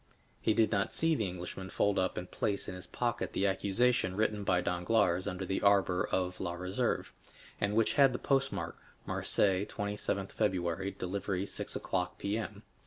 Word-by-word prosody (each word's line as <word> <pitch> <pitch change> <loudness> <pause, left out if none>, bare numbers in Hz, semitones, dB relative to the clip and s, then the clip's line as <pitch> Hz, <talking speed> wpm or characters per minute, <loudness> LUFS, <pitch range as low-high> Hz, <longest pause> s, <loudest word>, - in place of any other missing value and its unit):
He 110 - +2
did 110 - +3
not 100 -3 0
see 165 0 +4
the 110 -9 0
Englishman 90 +1 -6
fold 100 +1 +1
up 95 0 0
and 90 - -5
place 100 -2 -1
in - - -4
his 90 0 -8
pocket 120 -1 -2
the 100 - +1
accusation 100 +1 +2
written 105 0 0
by 90 -2 +3
Danglars 90 +1 +1
under 95 0 -3
the 95 - -1
arbor 95 -3 +3
of 90 -1 -1
La 85 -2 -2
Réserve, 90 +2 -1 0.5
and 100 +1 0
which 115 -1 +3
had 135 -2 +6
the 125 - -2
postmark, 135 +1 0 0.3
"Marseilles, 95 0 +2
27th 100 -1 -3
February, 95 -1 0
delivery 95 0 -2
6 - - -5
o'clock, 90 -1 -2
P.M." 105 0 -3
100 Hz, 170 wpm, -32 LUFS, 90-105 Hz, 0.5 s, had